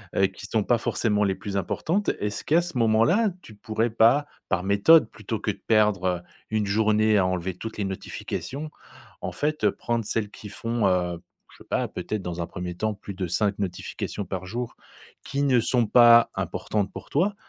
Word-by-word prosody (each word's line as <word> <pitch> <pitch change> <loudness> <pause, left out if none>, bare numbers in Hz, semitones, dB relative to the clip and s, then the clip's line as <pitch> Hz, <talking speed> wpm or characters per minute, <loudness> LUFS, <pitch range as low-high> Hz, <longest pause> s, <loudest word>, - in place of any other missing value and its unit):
heu, 95 - +4
qui 100 +1 -10
sont 110 0 +1
pas 120 +2 +3
forcément 105 -2 0
les 95 -1 +1
plus 100 -1 -4
importantes. 170 - -1
Est-ce 105 +1 -3
qu'à 165 +3 +3
ce 170 -7 -5
moment-là, 120 - +3
tu 110 - -13
pourrais 110 +1 -1
pas 115 +6 +4 0.2
par 90 - 0
méthode 105 +8 +5
plutôt 110 0 -5
que 105 - -1
de 100 - -13
perdre, 105 -4 +3
heu, 90 -1 +1 0.3
1 110 -1 0
journée 110 +1 +3
à 95 - +3
enlever 90 0 -1
toutes 115 +3 -7
les 100 - -1
notifications, 140 +9 -5 0.5
en - - -3
fait, 150 +1 -2
heu, - - +5
prendre 115 -2 -2
celles 105 -1 -1
qui 105 - -10
font, 115 0 -1
heu, 90 -2 0 0.3
je - - -18
sais - - -31
pas - - 0
peut-être 110 -2 -4
dans 90 -1 -4
un 85 - -3
1er 90 0 -6
temps 110 +3 -1
plus 100 0 -9
de 90 -1 -3
5 100 +3 0
notifications 100 +2 -4
par 95 0 -5
jour 120 +4 -5 0.5
qui 140 +1 -1
ne 130 -4 +4
sont 120 0 +2
pas 120 +1 +7
importantes 100 -2 -2
pour - - -9
toi. 195 +8 +1
110 Hz, 200 wpm, -25 LUFS, 95-120 Hz, 0.5 s, pas